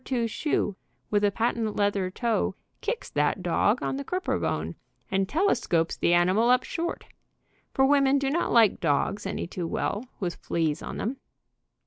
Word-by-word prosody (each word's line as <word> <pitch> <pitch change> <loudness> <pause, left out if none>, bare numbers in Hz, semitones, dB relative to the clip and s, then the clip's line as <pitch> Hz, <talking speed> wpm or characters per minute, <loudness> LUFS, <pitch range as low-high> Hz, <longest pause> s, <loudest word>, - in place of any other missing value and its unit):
2 245 -3 -1
shoe, 225 -3 -1 0.4
with 205 -1 +2
a 205 - +5
patent 225 +1 -1
leather 200 -2 +1
toe, 230 +3 -1 0.3
kicks 475 0 -3
that - - 0
dog - - +2
on - - -1
the 280 - -4
crouper 365 +6 -1
bone - - -2 0.4
and 195 0 +1
telescopes 275 - +1
the - - +1
animal 185 +7 +4
up 250 0 +4
short, 340 0 -4 0.7
for 265 - +3
women 275 0 +4
do 275 -1 0
not 340 +4 0
like 225 -4 +5
dogs 165 +6 0
any - - -3
too 175 0 -4
well, 205 +6 -2 0.2
with 175 -4 -3
fleas 160 -2 -1
on - - -6
them. 245 +6 -2
220 Hz, 165 wpm, -27 LUFS, 185-270 Hz, 0.7 s, a